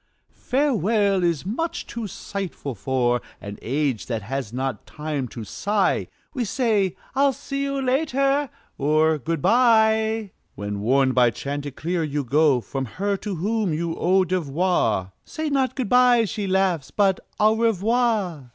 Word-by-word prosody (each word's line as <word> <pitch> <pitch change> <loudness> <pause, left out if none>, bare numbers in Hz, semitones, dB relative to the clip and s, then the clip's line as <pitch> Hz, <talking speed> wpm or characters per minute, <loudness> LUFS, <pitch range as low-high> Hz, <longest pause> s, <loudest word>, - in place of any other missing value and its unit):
"Farewell" 215 - +1
is 170 -2 0
much 320 - -3
too 235 -2 -5
sighful 190 -8 -5
for 125 +2 0 0.2
An 100 0 -8
age 135 -2 -1
that 115 -4 -3
has 130 0 -4
not 130 +1 -4
time 150 -4 -4
to 115 -1 -8
sigh. 200 - 0 0.3
We 255 -5 -1
say, 210 -5 +1 0.2
"I'll 275 +1 +3
see 275 +2 -5
you 275 0 -1
later," 275 +1 +1 0.3
or 155 +2 +3
"Good 160 +3 -3
by!" 220 -3 +3 0.2
When, 100 0 -4
warned 130 +5 +2
by 125 -1 +5
chanticleer, 145 +7 -3
you 150 -2 -2
go 140 0 +3
From 135 +3 -4
her 200 +1 0
to 200 -1 -5
whom 200 0 0
you 165 +1 -2
owe 185 +2 +3
devoir, 160 - 0
"Say 315 -1 -4
not 265 -2 +1
'good 255 -5 -2
by,'" 250 -2 +5
she 210 -1 -3
laughs, 185 -6 +1
"but 195 -3 +2 0.2
'Au 215 +1 +4
Revoir!'" 220 - +1
185 Hz, 145 wpm, -23 LUFS, 140-225 Hz, 0.3 s, by